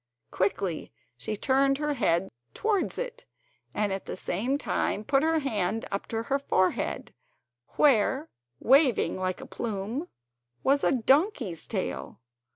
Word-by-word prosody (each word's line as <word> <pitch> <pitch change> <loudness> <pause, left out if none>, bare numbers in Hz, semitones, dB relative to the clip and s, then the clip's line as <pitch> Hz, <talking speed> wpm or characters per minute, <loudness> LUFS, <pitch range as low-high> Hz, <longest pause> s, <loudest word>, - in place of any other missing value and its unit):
Quickly 190 -3 -1 0.2
she 125 - -4
turned 275 +3 +2
her 300 0 -1
head 185 -8 +1 0.2
towards 425 -3 0
it, - - -5 0.5
and 205 -2 0
at 195 - -5
the - - -5
same 235 +11 -1
time 215 -6 -1
put 275 +4 +2
her 320 +1 +2
hand 225 - -1
up 200 - -3
to 225 0 -2
her 275 +4 0
forehead, 185 -9 0 0.6
where, 270 +2 +3 0.3
waving 270 -1 +4
like 185 -1 -2
a - - -8
plume, 225 - -4 0.6
was 280 +1 +3
a - - +4
donkey's 265 - +1
tail. 65 +1 -4
245 Hz, 135 wpm, -28 LUFS, 195-285 Hz, 0.6 s, waving